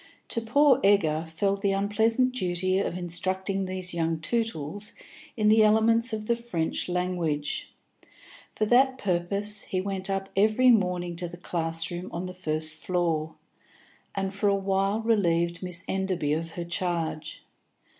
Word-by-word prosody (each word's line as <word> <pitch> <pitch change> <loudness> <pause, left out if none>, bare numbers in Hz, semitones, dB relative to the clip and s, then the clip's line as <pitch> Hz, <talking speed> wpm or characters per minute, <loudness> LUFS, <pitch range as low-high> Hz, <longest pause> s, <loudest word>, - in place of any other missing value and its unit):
To 230 - +1
poor 280 +5 +4
Egger 165 -6 +3
fell 195 +5 0
the 200 0 0
unpleasant 220 +6 +2
duty 185 -3 0
of 180 - -2
instructing 190 +2 -1
these 185 -1 -4
young 165 -1 -1
Tootles 205 -1 -3 0.4
in 215 -1 +2
the 215 +1 +6
elements 225 +2 +4
of 215 -1 -4
the 235 - +2
French 205 -9 -2
language. 175 -5 -2 0.8
For 215 - -1
that 260 +4 +4
purpose 200 +2 0
he 185 - -2
went 190 0 -3
up 195 0 -2
every 215 +6 +5
morning 180 -5 +1
to 175 0 -1
the 175 +1 -10
class 165 -2 -1
room 175 +1 -5
on 175 +2 -4
the 180 - -6
first 155 -3 -2
floor, 160 -1 -1 0.8
and 195 0 -2
for 205 +1 +1
a 200 - +3
while 195 +2 0
relieved 170 -6 +1
Miss 180 0 -3
Enderby 185 -6 -1
of 165 +1 -3
her 175 - -5
charge. 165 -3 -3
185 Hz, 150 wpm, -27 LUFS, 170-210 Hz, 0.8 s, the